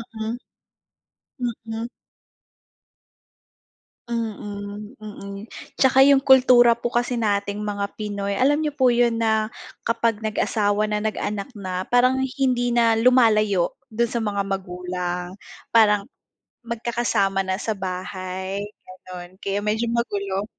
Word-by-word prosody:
Mm. 220 +2 -3 1.3
Mm. 225 +1 -4 2.2
Mm, 210 -1 -5
mm 205 0 -8 0.3
tsaka 265 0 +6
'yung 280 0 +6
kultura 250 -3 +6
po 235 0 -4
kasi 245 +1 0
nating 205 -2 -1
mga 200 -1 -2
Pinoy 200 -2 -3
alam 285 +5 +3
niyo 300 -2 -2
po 260 -3 +4
'yun 235 -1 +3
na 220 -1 +1 0.4
kapag 230 -2 +1
nag-asawa 215 -1 0
na, 210 - +1
nag-anak 210 -1 -3
na, 185 -2 -4
parang 255 +2 +3
hindi 255 -2 0
na 230 -1 +4
lumalayo 215 -7 +4 0.2
do'n 235 0 -1
sa 235 - -1
mga 205 -3 -1
magulang. 180 -1 -4 0.3
Parang 210 -3 +5 0.6
magkakasama 235 -4 -1
na 190 0 -1
sa 220 - -2
bahay 185 0 -4 0.2
gano'n 185 0 -11
kaya 200 +1 -2
medyo 220 +2 0
magulo. 200 -4 -1
215 Hz, 115 wpm, -23 LUFS, 200-235 Hz, 2.2 s, tsaka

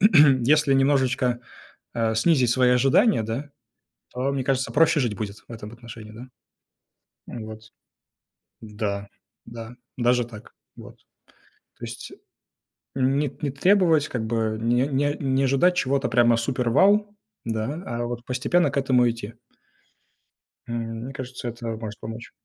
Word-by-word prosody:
если 145 - +5
немножечко, 130 -2 +2 0.5
а, 115 -1 0
снизить 125 0 +3
свои 125 0 +3
ожидания, 135 - +4
да, 115 +7 -4 0.6
то, 130 +2 -1
мне 135 -2 -2
кажется, 135 -1 0
проще 160 0 +4
жить 120 -5 0
будет 105 0 -5
в - - -12
этом 110 -1 -8
отношении, 115 -2 -11
да. 120 +4 -11 1.0
М, 110 -2 -7
вот, 110 0 -9 1.0
да 105 -2 -4 0.4
да, 115 +1 -9 0.2
даже 120 0 +2
так. 110 -3 -13 0.2
Вот. - - -12 0.8
То - - -7
есть - - -8 0.8
н 135 +1 +2
не 145 -2 -2
не 145 -3 -1
требовать, 165 0 +3
как 115 -3 -3
бы, 110 -1 -1
не 120 +4 +2
не 145 +1 0
не 135 -1 +1
ожидать 140 +7 +3
чего-то 135 -3 +1
прямо 120 0 +4
супер-вау, 195 - +2 0.3
да, 115 +9 -3
а 120 0 -3
вот 120 0 -5
постепенно 140 +5 +1
к - - -3
этому 125 -3 +3
идти. 115 -1 -6 1.3
М, 120 0 -3 0.3
мне 135 - -7
кажется, 125 -1 -7
это 115 0 -7
может 110 -1 -7
помочь. 115 +3 -8
125 Hz, 140 wpm, -24 LUFS, 115-140 Hz, 1.3 s, если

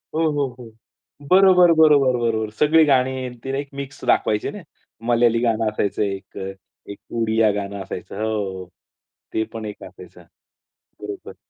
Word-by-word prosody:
हो, 160 -1 +2
हो. 145 -2 0
हो. 115 -2 -11 0.6
बरोबर, 185 -1 +6
बरोबर, 145 -5 +5
बरोबर. 110 -2 -1
सगळी 160 +2 +5
गाणी 130 -2 +2
आणि 125 -1 -8
ती 135 - -6
एक 140 - -5
मिक्स 140 0 -8
दाखवायची 105 -1 +1
ना. - - -9 0.5
मल्याळी 120 -1 +3
गाणं 115 -1 +1
असायचं 105 -1 -2
एक 95 -1 -5
अ, 95 - -4 0.4
एक 100 - -9
अ, - - -10
उडिया 110 -1 +2
गाणं 100 -1 -4
असायचं. 90 0 -8
हो. 95 -4 -3 0.7
ते 110 - +1
पण 110 -1 -6
एक 105 - -8
असायचं. - - -13 0.8
बरोबर. - - -8
115 Hz, 155 wpm, -21 LUFS, 105-140 Hz, 0.8 s, बरोबर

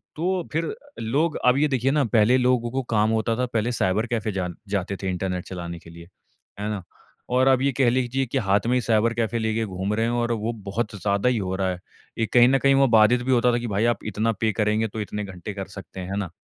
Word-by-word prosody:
तो 180 +2 -1
फिर 160 +1 -1 0.3
लोग 145 +8 0
अब 125 +1 +5
ये 150 +2 +3
देखिए 135 -1 +1
ना, 150 0 +2
पहले 115 +2 +4
लोगों 125 -2 +1
को 135 +1 -1
काम 105 +1 +3
होता 115 +1 0
था, 125 - +1
पहले 115 -1 -1
साइबर 105 -1 0
कैफ़े 110 -2 -2
जान 90 -3 -3
जाते 100 -1 -2
थे, 95 - -1
इंटरनेट 90 0 -2
चलाने 85 -2 -6
के 85 - -15
लिए। 85 0 -12 0.5
है 105 +1 -2
ना? 105 -4 -4 0.5
और 130 +1 +3
अब 130 -1 +4
ये 140 +1 +2
कह 130 -3 +4
लीजिए 130 +2 0
कि 130 +2 -3
हाथ 100 -4 +2
में 125 - +2
ही 125 - +2
साइबर 115 0 +2
कैफ़े 115 0 -1
लेके 110 0 -1
घूम 95 +1 -3
रहे 115 +1 +1
हैं 115 - 0
और 120 0 0
वो 110 +1 -2 0.2
बहुत 105 +2 -2
ज़्यादा 100 +3 +1
ही 125 - +1
हो 95 -2 -2
रहा 95 0 0
है। 90 - -6 0.4
एक 115 - -1
कहीं 120 -1 +7
न 135 - +4
कहीं 140 0 +4
वो 135 0 +5
बाधित 110 +3 +5
भी 130 - 0
होता 125 0 +4
था - - +2
कि, 120 - -4
"भाई, 105 +1 0
आप 120 -3 0
इतना 110 +2 0
पे 110 -1 +2
करेंगे, 105 +2 +1
तो 110 +1 -5
इतने 105 0 -4
घंटे 95 +1 -7
कर 95 -1 -6
सकते 95 -1 -10
हैं।" 90 - -6
है 100 - -2
ना? 100 -4 -3
110 Hz, 260 wpm, -24 LUFS, 100-125 Hz, 0.5 s, कहीं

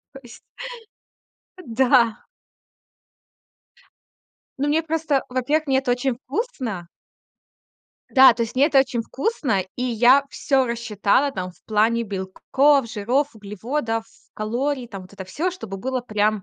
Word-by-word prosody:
То 270 - -11
есть 235 -1 -13 1.3
Да. 240 -1 +2 2.3
Ну, 280 - 0
мне 310 +2 +2
просто 315 -3 0
Во-первых, 275 +5 0
мне 265 -1 +2
это 265 -2 -1
очень 245 +1 0
вкусно. 260 - -4 1.3
Да, 265 -3 +8
то 235 - -1
есть 230 +2 -5
мне 275 +3 +5
это 280 -4 +5
очень 255 -3 -1
вкусно, 270 - -1 0.2
и 250 - -3
я 250 +3 +4
всё 270 -3 +1
рассчитала 235 +2 +1
там 185 -6 -5
в - - -29
плане 225 +2 +2
белков, 230 +7 +1
жиров, 250 +7 0
углеводов, 225 +3 -3 0.3
калорий, 245 +4 -2
там, 195 -4 -8
вот 185 - -16
это 195 -2 -8
всё, 325 - -2
чтобы 225 - -7
было 255 +5 -2
прям 215 -3 0
245 Hz, 130 wpm, -22 LUFS, 215-275 Hz, 2.3 s, Да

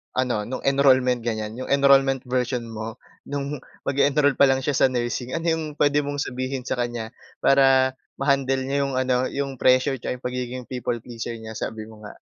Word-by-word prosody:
ano, 125 -5 0
no'ng 130 +4 -5
enrollment, 130 -3 +4
ganyan, 110 -1 -3
'yong 130 - -5
enrollment 140 -1 +5
version 125 -1 -1
mo, 110 +1 -6 0.3
nung 140 0 -3 0.3
mag-e-enroll 140 0 +3
pa - - +7
lang 135 0 +3
siya 145 - 0
sa - - +5
nursing. 120 +1 -2
Ano 165 - -3
'yong 160 -1 -1
puwede 145 0 +3
mong 145 0 -3
sabihin 130 +1 -4
sa - - 0
kanya 120 -2 -3 0.3
para 135 -1 +5 0.2
ma-handle 135 -1 +1
niya 140 +1 +1
'yong 135 - -3
ano, 130 -1 +2
'yong 140 -1 -3
pressure 130 +2 +4
'tsaka - - -3
'yong - - -18
pagiging 125 0 -4
people 125 -2 -2
pleasure 115 -1 -6
niya, 110 0 -8
sabi 110 0 -5
mo 110 -1 -14
nga. - - -11
130 Hz, 185 wpm, -24 LUFS, 120-140 Hz, 0.3 s, pa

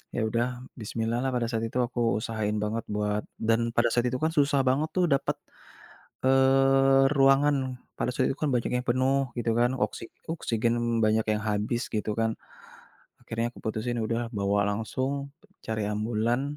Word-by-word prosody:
Ya 120 - 0
udah 120 +2 +1 0.3
bismillah-lah 115 +4 -2
pada 120 -1 0
saat 115 -1 -1
itu 125 - -3
aku 120 0 -6 0.2
usahain 110 -1 -2
banget 110 +2 -2
buat 105 0 -1 0.2
dan 115 +1 +2
pada 120 0 +4
saat 120 0 +2
itu 130 - -2
kan - - +4
susah 140 -1 +3
banget 150 +4 +1
tuh 180 -1 +3
dapat, 140 - 0 0.9
eee, 135 0 +5
ruangan. 135 +1 +5 0.4
Pada 125 - 0
saat 130 0 +1
itu 135 - -2
kan 150 - +2
banyak 120 - 0
yang 125 - -2
penuh 130 +1 +1
gitu 115 - 0
kan. 120 +1 +3
Oksi 105 - -6 0.3
oksigen 115 -7 0 0.3
banyak 110 +1 +2
yang 105 - -1
habis 110 +4 -1
gitu 105 -1 -2
kan. 115 +1 0 0.9
Akhirnya 115 +1 -3
aku - - -14
putusin 115 +2 -2
udah 115 +1 -1 0.2
bawa 100 +1 +1
langsung, 130 +6 -2 0.4
cari 110 -2 -2
ambulans, 120 +6 -1
120 Hz, 165 wpm, -27 LUFS, 110-135 Hz, 0.9 s, eee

